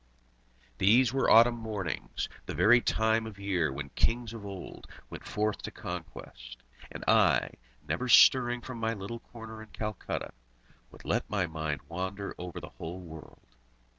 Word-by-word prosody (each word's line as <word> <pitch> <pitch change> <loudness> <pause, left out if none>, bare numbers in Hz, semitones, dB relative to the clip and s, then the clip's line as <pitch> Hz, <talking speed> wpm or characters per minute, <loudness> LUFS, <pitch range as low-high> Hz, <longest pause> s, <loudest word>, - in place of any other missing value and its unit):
These 115 +5 +5
were 135 - +2
autumn 120 +2 +7
mornings, 105 -5 -4 0.2
the - - -4
very 120 +3 +6
time 110 0 +1
of 105 -3 -10
year 95 -6 0
when 70 +1 -6
kings 115 - 0
of 105 -3 -8
old 95 -2 -9 0.2
went - - -8
forth 105 0 -1
to - - -5
conquest; - - -8 0.3
and - - -7
I, - - +4 0.4
never 125 - -1
stirring 120 0 +6
from 125 -1 -7
my 115 0 0
little 105 +4 -6
corner 110 -2 -10
in 110 - -12
Calcutta, 105 -2 -4 0.6
would - - -16
let - - -1
my 100 -4 +1
mind 80 -3 -3
wander 95 +3 -4
over 90 -1 -6
the - - -9
whole 85 +3 -6
world. 80 -3 -12
105 Hz, 155 wpm, -30 LUFS, 90-115 Hz, 0.6 s, autumn